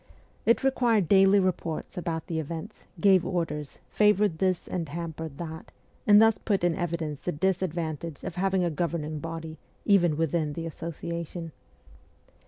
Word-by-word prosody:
It 230 +3 +4
required 240 -8 +2
daily 195 +2 +6
reports 180 -4 -2
about 165 -2 -3
the 165 -3 -2
events, 160 +1 -7
gave 190 -1 +5
orders, 150 -5 -3
favoured 210 -5 +3
this 185 -2 0
and 170 -5 -3
hampered 160 -2 -5
that, 160 -1 -7 0.4
and 205 0 +8
thus 225 0 +5
put 200 -5 0
in 175 -1 +3
evidence 160 -3 -3
the 180 - -2
disadvantage 170 -3 -2
of - - -4
having 190 0 +1
a 170 - 0
govern 165 0 -1
ing 155 0 -4
body, 160 0 -6 0.3
even 175 -7 +4
within 160 -1 0
the 165 +2 -5
Association. 170 +1 -5
170 Hz, 150 wpm, -27 LUFS, 160-190 Hz, 0.4 s, and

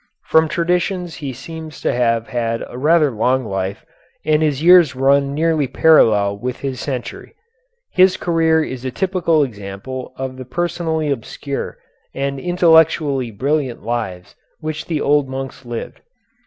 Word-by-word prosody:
From 160 0 +3
traditions 175 +2 -1
he 145 -4 -5
seems 160 +4 -9
to - - 0
have 115 -2 +1
had 115 -2 -2
a - - -11
rather 150 +2 +3
long 125 +3 +1
life, 95 -1 -4 0.4
and 155 0 +3
his 150 -2 0
years 175 -6 +6
run 140 +1 +3
nearly 160 -2 +1
parallel 110 -9 +4
with 125 +2 -4
his 135 -2 -3
century. 125 -4 -6 0.6
His 185 0 +4
career 165 -2 +2
is 130 -4 -6
a 130 - -2
typical 170 0 +1
example 110 +2 -6
of 130 -1 -5
the 130 - -8
personally 160 +1 -2
obscure 140 +2 -5 0.4
and 140 0 -2
intellectually 160 -6 +3
brilliant 130 +2 -2
lives 105 -6 -4 0.2
which 155 -1 -5
the 160 -3 -1
old 145 -1 +2
monks 135 0 -6
lived. 120 -1 -6
140 Hz, 140 wpm, -19 LUFS, 125-160 Hz, 0.6 s, years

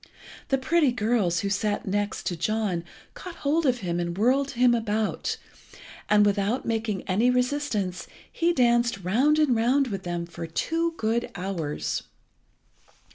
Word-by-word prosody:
The 270 - +2
pretty 290 +1 +2
girls 210 -7 +1
who 200 - -1
sat 205 0 -1
next 205 +1 -1 0.2
John 205 -3 -1 0.3
caught 365 -2 -9
hold 300 +2 +1
of 250 -2 +1
him 175 -2 -2
and 170 0 -3
whirled 265 +6 +2
him 245 0 +5
about, 220 -2 -1 0.7
and, 210 0 +5
without 205 +4 0
making 220 -4 -2
any 215 +6 +2
resistance, 250 -7 -1 0.2
he 340 +1 +1
danced 240 - +2
round 260 - +3
and 300 -5 +3
round 250 +4 +2
with 195 -3 -4
them 175 -1 -3
for 170 -1 -7
two 330 - -1
good 225 +2 0
hours. 155 - -3
220 Hz, 140 wpm, -26 LUFS, 190-255 Hz, 0.7 s, him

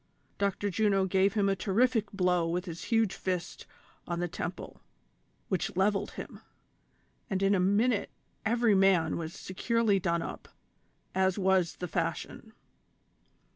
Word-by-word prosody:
Dr. 200 0 0
Juno 195 0 +2
gave 190 +2 +2
him 205 -2 +2
a 195 - +2
terrific 220 +3 +1
blow 180 -3 +1
with 175 +2 -2
his 170 -2 -7
huge 225 -4 +2
fist 180 -2 -4 0.4
on 170 -1 -2
the 175 - 0
temple, 170 - -6 0.7
which 185 -2 -2
levelled 200 +1 +1
Mm, - - -8 0.9
and 195 -2 -1
in 195 +1 +4
a 195 - +2
minute 205 +5 +2 0.3
every 230 0 +3
man 190 -4 +3
was 165 0 -5
securely 215 +1 0
done 170 -2 0
up, - - -7 0.7
as 190 0 +2
was 190 -3 +2
the 180 - -5
fashion. - - -3
195 Hz, 135 wpm, -30 LUFS, 180-205 Hz, 0.9 s, in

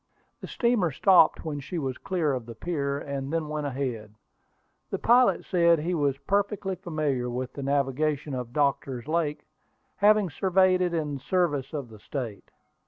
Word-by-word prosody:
The - - -8
steamer 235 -8 +1
stopped 175 +2 +4
when 150 -2 -3
she 145 +6 -6
was 135 -5 -3
clear 165 -6 0
of 125 -3 -4
the 115 - -8
pier, 140 +1 -2
and 140 -1 -5
then 160 -2 -1
went 150 -1 -2
ahead. 125 -6 -4 0.7
The - - -2
pilot 245 +2 +4
said 170 -2 +4
he 165 +4 -2
was 145 -4 +1
perfectly 200 +1 -1
familiar 155 -8 -2
with 125 +1 -4
the 140 - -6
navigation 140 +1 0
of 125 -2 -4
Doctor's 135 -3 -1
Lake, 155 -2 -1 0.5
having 210 -3 +4
surveyed 185 +2 +3
it 175 -1 0
in 150 -3 -2
the 140 - -4
service 145 -3 0
of 140 -6 -5
the 110 -1 -13
State. 115 -3 -6
150 Hz, 170 wpm, -27 LUFS, 135-175 Hz, 0.7 s, stopped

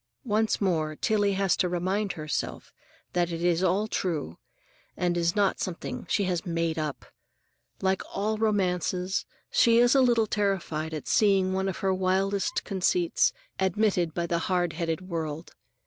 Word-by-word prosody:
Once 220 -1 +1
more 160 -6 0
Tillie 205 +3 +1
has 195 -1 +2
to 180 - 0
remind 190 +3 -1
herself 155 -1 -4 0.4
that 175 -1 +1
it 165 0 -4
is 175 -1 +2
all 190 +3 +2
true, 160 - -3 0.6
and 175 -1 0
is 170 +1 +1
not 200 -2 +2
something 180 -2 -5
she 205 - +2
has 180 -3 -1
"made 165 -2 -1
up." 150 -2 -4 0.8
Like 190 0 +2
all 215 +2 -1
romancers, 185 -3 0 0.2
she 230 -1 +5
is 240 +1 +5
a 270 - +5
little 240 -3 +4
terrified 180 -7 -1
at 150 - -6
seeing 195 -3 +3
one 190 +1 0
of 185 - -4
her 190 - +3
wildest 190 +1 0
conceits 335 - +1 0.3
admitted 190 -3 +1
by 170 - 0
the 170 0 0
hardheaded 175 -2 0
world. 165 -3 -5
185 Hz, 150 wpm, -27 LUFS, 170-200 Hz, 0.8 s, she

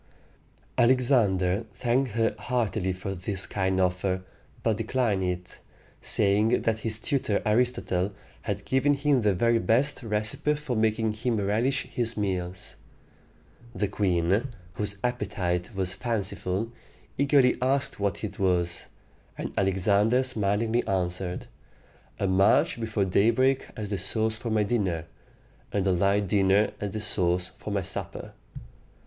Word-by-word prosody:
Alexander 115 -6 +3
thanked 125 -1 0
her 115 0 +1
heartily 110 -6 -1
for 95 +1 -4
this 95 +1 -3
kind 95 -1 -1
offer, 90 0 0 0.4
but 110 -3 +1
declined 115 -3 0
it, 90 0 -4 0.4
saying 105 +4 +3
that 110 -1 0
his 110 0 +1
tutor 115 -4 0
Aristotle 105 -5 +1 0.3
had 100 -2 -4
given 140 +2 +2
him 140 -2 +2
the 105 -3 +2
very 115 +4 +3
best 130 +7 +1
recipe 110 +6 0
for 145 -4 -4
making 110 0 +1
him 115 +1 -1
relish 115 +7 +1
his 120 -2 -3
meals. 95 -3 -3 1.0
The 105 - 0
queen, 95 +3 +1 0.3
whose 100 +1 -3
appetite 100 -5 -2
was 95 -1 -1
fanciful, 105 -1 -2 0.5
eagerly 140 -3 +4
asked 135 0 0
what 100 0 -1
it 105 - -5
was; 90 -3 0 0.5
and - - -5
Alexander 100 +6 +2
smilingly 110 -1 0
answered, 90 -1 -2 0.7
"A - - -1
march 95 +4 +3
before 110 -3 -1
daybreak 115 +8 +2
as 105 -1 -5
the 100 - -1
sauce 110 +4 +1
for 115 +1 -5
my 110 -1 +2
dinner, 95 -7 -1 0.7
and 100 -2 0
a 95 - +3
light 100 +3 +2
dinner 100 +2 +3
as 105 - -3
the 110 - -4
sauce 90 -3 0
for - - -9
my 100 -2 -1
supper." - - -4
105 Hz, 130 wpm, -27 LUFS, 95-115 Hz, 1.0 s, eagerly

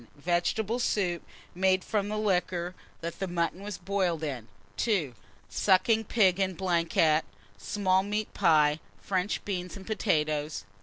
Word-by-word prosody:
Vegetable 180 - 0
soup, 180 -8 0 0.3
made 185 +1 +2
from 205 -2 -1
liquor 185 -4 0 0.3
that 170 +3 -4
mutton 170 +1 -1
was 205 -1 -5
boiled 180 -3 -1
in. 130 -7 -4 0.3
2. 185 - +1 0.3
Sucking 220 +3 +3
pig 190 -4 +3
en 190 -1 0
blanquette, 165 -3 +2 0.4
small 190 - +1
meat 210 +2 -3
pie, 150 -1 +4 0.2
French 190 +1 -1
beans, 180 -2 -4
and 190 - -11
potatoes. 155 -8 0
185 Hz, 120 wpm, -29 LUFS, 170-200 Hz, 0.4 s, pie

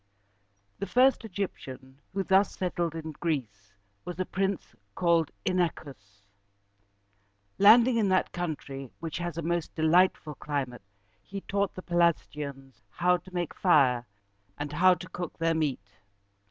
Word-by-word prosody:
The 200 - -3
first 255 +6 +4
Egyptian 135 -9 -6
who 195 0 -1
thus 190 +1 +3
settled 175 -3 -2
in 160 -1 -5
Greece 110 -11 -4 0.3
was 180 0 -7
a 185 - 0
prince 195 0 -2 0.2
called 170 -3 +2 0.2
In´a 180 -2 +2
chus. 105 -8 -14 1.4
Landing 230 +4 +7
in 210 -3 +2
that 185 0 +2
country, 140 -6 -5
which 165 -1 -5
has 175 -2 -4
a 170 - -3
most 170 0 -2
delightful 160 -1 +3
climate, 140 -4 -4 0.4
he 195 - -7
taught 200 0 -1
the 185 - -8
Pelasgians 150 -7 -1
how 180 - +2
to 185 - -16
make 175 -3 -3
fire 130 -9 +3 0.5
and 145 0 -5
how 180 +4 +5
to 180 +1 -9
cook 175 -2 -6
their 165 0 +1
meat. 135 -11 -3
170 Hz, 140 wpm, -28 LUFS, 140-185 Hz, 1.4 s, Landing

